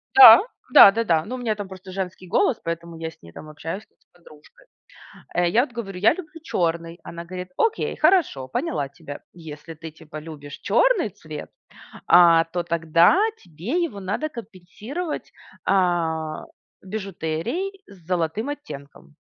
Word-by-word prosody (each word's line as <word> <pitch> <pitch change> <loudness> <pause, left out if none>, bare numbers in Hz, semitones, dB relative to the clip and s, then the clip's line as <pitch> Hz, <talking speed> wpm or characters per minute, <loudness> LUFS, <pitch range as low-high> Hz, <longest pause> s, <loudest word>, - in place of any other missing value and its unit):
Да, 400 -1 +11 0.3
да-да-да! 195 -6 +7
Ну, 255 - -5
у - - -5
меня 225 -3 -1
там 205 -2 -6
просто 190 0 -11
женский 185 -1 -5
голос, 255 - +2
поэтому 170 0 -5
я 160 0 -4
с 160 - -19
ней, 85 0 -14
там, 155 - -11
общаюсь, 165 +7 -6
как - - -43
с - - -36
подружкой. 175 - -19 0.7
Э, 175 -1 +2
я 230 +7 +4
вот 245 - -19
говорю: 195 -6 -6
"Я 215 +8 +5
люблю 325 -2 -10
черный". 170 - -2
Она 170 0 -8
говорит: 180 +1 -7
"Окей, 450 -1 0
хорошо, 310 - +2
поняла 140 +1 -2
тебя. 145 0 -10
Если 160 -1 -10
ты, 160 +1 -10
типа, 155 -1 -11
любишь 150 -2 -10
черный 450 - +2
цвет, 155 -4 -9 0.6
а, 170 -2 +7
то 175 +1 -3
тогда 170 - +3 0.2
тебе 185 - -3
его 205 -12 -4
надо 200 +11 -3
компенсировать, 230 - -7 0.3
а, 165 -4 0 0.4
бижутерией 200 - -4
с 180 -5 -17
золотым 180 - -1
оттенком. 140 - -9
175 Hz, 150 wpm, -23 LUFS, 160-225 Hz, 0.7 s, Да